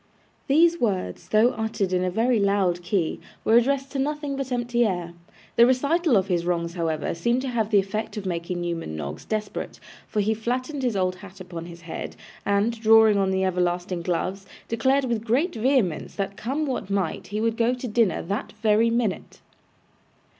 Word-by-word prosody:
These 335 +4 +4
words, 200 -6 -2
though 215 +3 +5
uttered 220 -4 -2
in 180 0 +2
a 185 - +1
very 230 +5 +2
loud 195 -3 +2
key, 175 -2 -1 0.3
were 225 - +4
addressed 270 +3 +2
to 275 - -3
nothing 290 0 -2
but 270 -1 -4
empty 240 -1 +1
air. 175 -5 -2 0.4
The 235 - +8
recital 280 - +3
of 190 - +2
his 175 -3 0
wrongs, 170 -1 -1
however, 160 -3 -1
seemed 235 +10 0
to 265 - -2
have 225 -3 0
the 210 - +4
effect 210 +3 -1
of 205 - -5
making 175 0 -3
Newman 170 - -3
Noggs 75 -2 -6
desperate; 215 -2 -4 0.3
for 215 - -2
he 210 +2 +2
flattened 255 +6 -3
his 245 -4 0
old 185 -1 0
hat 195 0 -13
upon 175 -3 -7
his 170 0 -11
head, 170 -2 -6 0.3
and 205 +3 +1
drawing 220 -2 +6
on 195 -1 +2
the 190 0 +1
everlasting 180 -1 0
gloves, 185 +3 -2 0.2
declared 265 +4 +2
with 230 -3 -1
great 260 +11 +1
vehemence, 230 - 0
that 195 0 -3
come 270 +9 -2
what 250 -8 -3
might, 195 -4 -1
he 210 +3 -3
would 225 0 +1
go 235 +2 +2
to 250 0 -5
dinner 220 -4 +1
that 200 +5 -4
very 220 +1 +4
minute. 230 -5 -2
215 Hz, 185 wpm, -25 LUFS, 185-240 Hz, 0.4 s, The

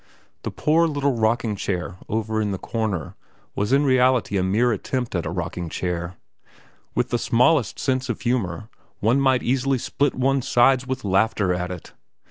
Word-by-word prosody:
The - - -4
poor 165 +2 +2
little 140 -3 0
rocking 115 -1 +1
chair 95 -1 -3
over 110 0 -1
in 105 - -1
the 95 - -2
corner 105 -8 -3 0.4
was 105 +3 -1
in 140 +2 +4
reality 130 -6 +3
a 95 - +2
mere 105 +7 +2
attempt 120 +3 -3
at 85 -3 -2
a - - -2
rocking 85 0 -4
chair; 85 +1 -3 0.8
with 120 +1 0
the 120 - +1
smallest 125 - +2
sense 130 -1 -1
of 120 - -3
humour, 110 -7 -1 0.3
one 120 +6 +2
might 130 -2 +3
easily 135 +2 +1
split 140 +4 -1
one's 135 0 +1
sides 130 +1 +4
with 130 -3 -4
laughter 100 -1 +2
at 90 0 -3
it. 90 -2 -8
115 Hz, 170 wpm, -23 LUFS, 95-130 Hz, 0.8 s, in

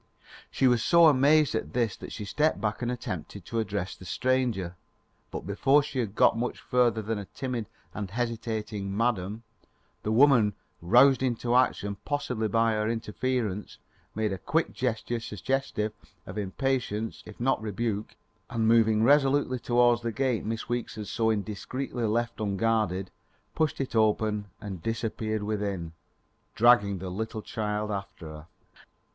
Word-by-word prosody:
She 130 - +2
was 120 -2 +3
so 170 -1 +6
amazed 150 0 +5
at - - -3
this 115 -4 0
that - - -9
she 105 - -6
stepped 150 +9 +1
back 110 +1 -2
and 120 - -1
attempted 95 -5 -6
to 115 - -2
address 100 -4 -2
the - - -14
stranger. 120 -5 0 0.5
But - - -6
before 135 +9 +3
she 135 - -4
had 110 -4 -2
got - - +5
much 120 +2 -2
further 120 -3 +1
than 110 0 -2
a 100 - -6
timid 125 -1 -4 0.3
and 100 -3 -4
hesitating 110 -3 -3
Madam, 110 -2 0 0.6
the 105 - -2
woman, 120 -4 +5 0.3
roused 130 +11 +5
into 120 -1 0
action 100 -5 +2
possibly 125 -6 -1
by 115 +2 +2
her 110 0 0
interference, 115 -2 -2 0.4
made 110 -2 0
a 95 - -5
quick 160 - 0
gesture 120 -1 -2
suggestive 110 0 -2 0.3
of 95 - -8
impatience 110 +1 -2
if 110 - -11
not 125 -1 +1
rebuke, 110 0 -3 0.3
and 115 -1 0
moving 110 -1 +4
resolutely 135 -1 +3
towards 120 0 +3
the 115 -1 -2
gate 125 0 0
Miss 115 +1 -4
Weeks 120 0 -3
had 105 -1 -5
so 110 -1 +1
indiscreetly 110 +4 -3
left 115 +2 -1
unguarded, 100 -2 0 0.4
pushed 155 -2 0
it 135 -3 -3
open 105 -1 +2
and 100 -6 -7
disappeared 110 0 -2
within, 100 -5 -2 0.6
dragging 105 -4 +5
the 90 0 -6
little 110 +2 -4
child 105 -1 -2
after 100 -4 -6
her. 80 +1 -10
110 Hz, 150 wpm, -28 LUFS, 105-125 Hz, 0.6 s, so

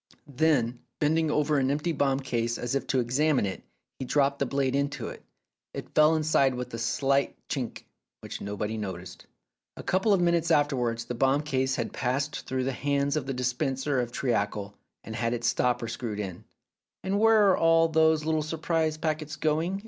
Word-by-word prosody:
Then, 135 -5 +1 0.2
bending 160 +1 +2
over 150 -1 +2
an 130 -1 +1
empty 150 +4 0
bomb 140 -3 +1
case 120 -3 -1
as 120 0 -3
if 140 - -1
to 130 - +1
examine 130 +1 +2
it, 95 - -4 0.4
he - - -3
dropped 140 +1 +1
the 140 - 0
blade 135 0 0
into 140 +1 -2
it. - - -10 0.5
It - - -7
fell 155 +1 +5
inside 150 -4 +2
with 125 -1 -6
a 115 - -4
slight 140 +3 +1
chink, 130 -5 -4 0.4
which - - -7
nobody 105 +2 -3
noticed. 95 -3 -7 0.5
A - - -7
couple 190 +4 +1
of 195 - +4
minutes 170 -1 +2
afterwards 130 -7 +1
the - - -4
bomb 135 +4 +2
case 130 -3 0
had - - -3
passed 135 +3 -2
through 130 0 -1
the 135 - -1
hands 140 +2 0
of 145 -4 -2
the 135 - -2
dispenser 130 +2 -1
of 120 -1 -4
treacle, 105 -5 -1 0.3
and 110 - -7
had 115 +1 0
its 120 0 -4
stopper 125 -1 +1
screwed 115 -2 -4
in. 95 -4 -6 0.6
"And 195 +2 0
where 220 -2 +5
are 185 - +5
all 165 0 +4
those 160 -1 +3
little 160 -1 +1
surprise 160 0 -1
packets 155 -1 -2
going?" 160 +5 0
140 Hz, 185 wpm, -27 LUFS, 125-155 Hz, 0.6 s, fell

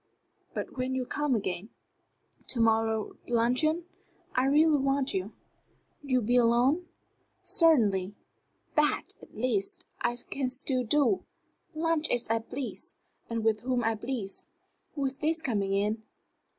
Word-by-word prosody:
But - - -5
when'll 255 +1 -1
you 255 -1 -1
come 295 0 0
again? 195 -1 -3 0.8
To 245 - 0
morrow 225 -1 +2
luncheon? 255 +8 +2 0.5
I 255 - +2
really 300 +2 +5
want 275 0 +1
you." 190 +3 -2 0.7
"Would 285 - -12
you 255 -1 +3
be 240 +3 +2
alone?" 245 +8 +3 0.6
"Certainly. 210 - +3 0.6
That, 300 -1 +2
at - - -15
least, 220 -4 0 0.2
I 240 - +1
can 255 +2 -3
still 255 0 +2
do 295 - +2 0.5
lunch 320 -1 +1
as 245 - 0
I 225 - +3
please, 250 +3 -6 0.3
and 230 -1 -2
with 220 -1 +3
whom 245 +1 -1
I 225 0 +2
please. 220 -3 -5 0.5
Who 280 -2 -1
is 265 0 0
this 315 +2 0
coming 200 -7 0
in? 210 +2 0
250 Hz, 135 wpm, -29 LUFS, 225-280 Hz, 0.8 s, really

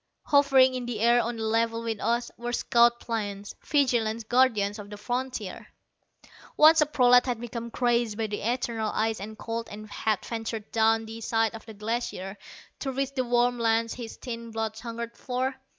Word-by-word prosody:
Hovering 275 -2 +5
in 250 -1 -4
the 235 -3 -3
air, 235 +2 +4
on 235 0 -3
a 225 - -4
level 230 +1 0
with 225 -2 -3
us, 235 +2 0
were 240 +1 -5
scout 235 0 +3
planes, 205 -3 -4
vigilant 230 -6 +1
guardians 225 -5 +2
of 205 -1 -9
the 205 - -8
frontier. 250 +4 -4 0.9
Once 315 +1 +7
a 300 - +3
prolat 250 -3 +5
had 245 -3 -1
become 235 0 -6
crazed 235 -3 +1
by 225 - 0
the 210 -1 -4
eternal 230 -1 -1
ice 220 0 0
and 215 +2 -8
cold, 230 +1 -4
and 215 +1 -9
had 215 -1 -1
ventured 225 -2 -5
down 225 0 +3
the 225 +1 -8
side 225 0 +1
of 225 0 -10
the 220 - -9
Glacier, 210 -3 -3 0.4
to 270 - -3
reach 270 +1 -2
the 260 -2 0
warm 245 0 +2
lands 230 0 +1
his 235 -2 -7
thin 235 -2 -6
blood 225 -1 -3
hungered 235 0 -6
for. 255 +1 -2
230 Hz, 180 wpm, -27 LUFS, 220-245 Hz, 0.9 s, Once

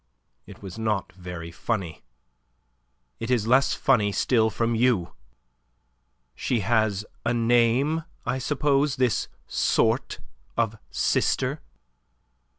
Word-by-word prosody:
It - - -13
was 95 +3 -8
not 105 -4 -1
very 90 -2 -8
funny. 95 -2 -3 1.2
It 115 - -4
is 120 -4 +2
less 130 +3 +3
funny 105 -7 +2
still 110 +1 +2
from 115 +2 -1
you. 115 -6 +1 1.2
She 115 - -1
has 110 -1 +1 0.2
a 120 +1 0
name, 120 +7 +2 0.2
I 130 +1 -1
suppose, 145 +1 +1
this 125 -5 +1 0.2
sort - - +1 0.4
of 115 -2 0
sister?" - - 0
115 Hz, 105 wpm, -25 LUFS, 105-125 Hz, 1.2 s, less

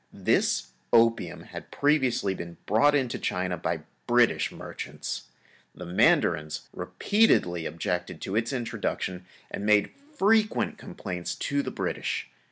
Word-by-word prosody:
This 65 - +1 0.2
opium 115 0 +3
had - - -9
previously 130 -9 +2
been 85 -2 -8
brought 145 +8 +4
into 130 -4 0
China 90 0 -1
by 85 - -2 0.3
British - - +3
merchants. - - -6 0.5
The 90 - -8
mandarins 75 -3 +2
repeatedly 90 - +2
objected 80 +1 -3
to 95 - -3
its 115 +1 +1
introduction 95 -7 -3 0.2
and - - -4
made 105 -1 +4 0.3
frequent 215 +2 +2
complaints 90 0 -5
to 140 0 -1
the - - -4
British. - - -3
105 Hz, 120 wpm, -27 LUFS, 90-140 Hz, 0.5 s, brought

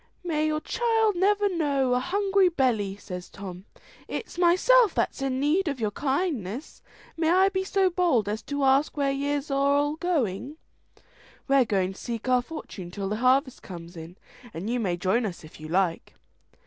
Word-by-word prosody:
"May 310 -3 0
your 305 0 -1
child 450 -1 +1
never 405 +3 +2
know 285 -8 +1
a 250 - +2
hungry 390 +4 +2
belly!" 230 - 0
says 180 -3 -8
Tom; 190 -2 -9 0.4
"it's - - -6
myself 390 +7 +5
that's - - -1
in 265 -1 -1
need 320 +7 +1
of 280 -4 -2
your 215 -2 -1
kindness. 270 - -3 0.3
May 325 -1 +1
I 375 +3 +5
be 380 -1 -2
so 385 -1 +1
bold 335 - +2
as 210 +2 -2
to 285 -1 -3
ask 270 +3 +3
where 280 -1 +1
yez 285 +1 -2
are 280 +1 +2
all 290 +1 +1
going?" 295 - -2 0.9
"We're 270 -2 +4
going 195 -3 0
to - - -13
seek 235 0 -5
our 250 -1 +4
fortune 230 - -8
till 195 +1 -4
the 210 - -2
harvest 260 +2 +2
comes 175 -1 -10
in, 165 +3 -10 0.4
and 190 +8 -4
you 245 - 0
may 180 -6 -1
join 190 +7 +1
us 190 -7 -5
if 155 - -14
you 155 - -8
like." 175 0 -1
275 Hz, 180 wpm, -26 LUFS, 205-340 Hz, 0.9 s, myself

